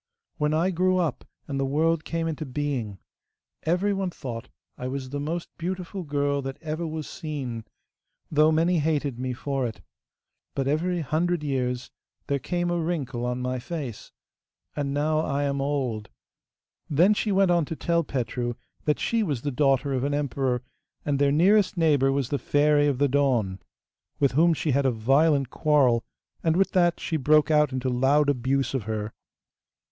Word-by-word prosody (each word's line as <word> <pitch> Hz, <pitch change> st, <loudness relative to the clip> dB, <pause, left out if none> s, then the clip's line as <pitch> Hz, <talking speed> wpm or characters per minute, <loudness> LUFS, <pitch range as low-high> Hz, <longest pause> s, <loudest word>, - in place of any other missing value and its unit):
'When 150 Hz, -1 st, +1 dB
I 165 Hz, +4 st, +2 dB
grew 185 Hz, +1 st, +2 dB
up 170 Hz, -7 st, -1 dB, 0.2 s
and 140 Hz, -1 st, -3 dB
the -, -, +1 dB
world 155 Hz, +3 st, +1 dB
came 165 Hz, 0 st, -2 dB
into 160 Hz, -1 st, -3 dB
being, 130 Hz, -7 st, -3 dB, 0.7 s
everyone 195 Hz, +2 st, +1 dB
thought 120 Hz, -9 st, -7 dB, 0.3 s
I 125 Hz, -, -5 dB
was 130 Hz, 0 st, -5 dB
the 145 Hz, -, -3 dB
most 165 Hz, +4 st, -3 dB
beautiful 185 Hz, +2 st, -4 dB
girl 145 Hz, -2 st, 0 dB
that 135 Hz, 0 st, -5 dB
ever 160 Hz, +1 st, -3 dB
was 155 Hz, -1 st, -5 dB
seen, 135 Hz, -9 st, -5 dB, 0.7 s
though 155 Hz, +1 st, +5 dB
many 165 Hz, +2 st, +2 dB
hated 145 Hz, -5 st, 0 dB
me 130 Hz, 0 st, -2 dB
for 135 Hz, 0 st, -2 dB
it. 110 Hz, -, -8 dB, 0.8 s
But 135 Hz, -1 st, -1 dB
every 170 Hz, +4 st, 0 dB
hundred 165 Hz, +3 st, 0 dB
years 125 Hz, -3 st, -2 dB, 0.3 s
there 140 Hz, 0 st, 0 dB
came 175 Hz, +3 st, -1 dB
a 175 Hz, -, 0 dB
wrinkle 135 Hz, -8 st, -2 dB
on 125 Hz, +1 st, -2 dB
my 125 Hz, 0 st, -2 dB
face. 135 Hz, -5 st, -6 dB, 0.6 s
And 145 Hz, -2 st, -2 dB
now 150 Hz, +2 st, +1 dB
I 145 Hz, -2 st, 0 dB
am 140 Hz, -1 st, -1 dB
old.' 130 Hz, -7 st, -2 dB, 0.8 s
Then 175 Hz, +8 st, +5 dB
she 210 Hz, 0 st, -1 dB
went 195 Hz, -1 st, +4 dB
on 170 Hz, -1 st, +3 dB
to 160 Hz, -, -5 dB
tell 170 Hz, +1 st, +1 dB
Petru 120 Hz, -3 st, -2 dB, 0.3 s
that 150 Hz, -, +2 dB
she 230 Hz, -1 st, +1 dB
was 145 Hz, -, -2 dB
the 145 Hz, -, -1 dB
daughter 135 Hz, 0 st, +2 dB
of 130 Hz, -1 st, 0 dB
an 145 Hz, +1 st, 0 dB
emperor, 135 Hz, -3 st, -1 dB, 0.4 s
and 140 Hz, -2 st, 0 dB
their 140 Hz, 0 st, +4 dB
nearest 190 Hz, +6 st, +4 dB
neighbour 145 Hz, -5 st, +3 dB
was 135 Hz, -2 st, -1 dB
the 140 Hz, -, -1 dB
Fairy 145 Hz, +3 st, +3 dB
of 140 Hz, -3 st, +1 dB
the 145 Hz, +2 st, +3 dB
Dawn, 125 Hz, -9 st, +1 dB, 0.6 s
with 140 Hz, -2 st, +3 dB
whom 165 Hz, +4 st, +4 dB
she 155 Hz, -, -1 dB
had 140 Hz, +1 st, +2 dB
a -, -, +4 dB
violent 135 Hz, +4 st, +2 dB
quarrel, 135 Hz, -6 st, +3 dB, 0.4 s
and 160 Hz, -1 st, +2 dB
with 195 Hz, -, +2 dB
that 175 Hz, -2 st, +3 dB
she 160 Hz, -, -1 dB
broke 150 Hz, +2 st, +4 dB
out 150 Hz, -2 st, +4 dB
into 130 Hz, 0 st, -2 dB
loud 135 Hz, +4 st, +3 dB
abuse 135 Hz, +1 st, 0 dB
of 130 Hz, -6 st, -2 dB
her. 110 Hz, 0 st, -3 dB
145 Hz, 175 wpm, -26 LUFS, 130-165 Hz, 0.8 s, though